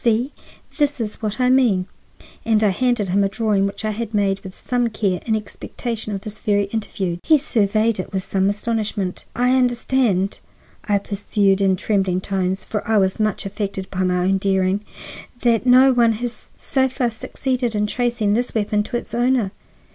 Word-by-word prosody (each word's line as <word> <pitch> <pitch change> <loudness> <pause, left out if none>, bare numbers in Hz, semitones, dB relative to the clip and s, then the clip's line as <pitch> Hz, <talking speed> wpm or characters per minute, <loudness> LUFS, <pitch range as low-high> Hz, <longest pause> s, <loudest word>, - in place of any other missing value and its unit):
See! 240 +4 +1 0.5
This 290 -2 +1
is 215 -2 -4
what 215 +1 -3
I 250 0 +3
mean." 235 -9 +3 0.6
And 220 -1 +2
I 210 - +5
handed 240 -1 0
him 200 +2 +3
a 195 - +1
drawing 205 -2 +1
which 200 - -5
I 215 - 0
had 225 0 -4
made 195 -1 +1
with 185 -1 -10
some 245 -1 0
care 200 -5 -1
in 220 - +2
expectation 220 +1 -5
of 195 - -5
this 215 0 -8
very 205 -2 +2
interview. 195 -5 -2
He 310 - +5
surveyed 220 -5 +1
it 185 - -5
with 190 -2 -2
some 195 0 +1
astonishment. 205 -3 -2
"I 250 +2 +3
understand," 245 -6 +1 0.5
I 205 -1 +2
pursued 200 -1 0
in 190 -1 +3
trembling 190 -2 0
tones, 190 0 -2
for 210 - -3
I 220 -1 +3
was 190 0 +1
much 215 -1 0
affected 195 -1 -4
by 185 - -2
my 180 -1 +1
own 195 +1 +2
daring, 190 +1 +1 0.6
"that 235 0 +2
no 260 +2 +7
one 235 -2 +4
has 235 +1 -6
so 265 -1 +1
far 250 -2 -1
succeeded 245 +1 -2
in 210 0 +1
tracing 235 -2 0
this 245 +2 -1
weapon 210 -1 +1
to 230 +3 -3
its - - -8
owner. 240 -4 +2
215 Hz, 185 wpm, -21 LUFS, 195-240 Hz, 0.6 s, no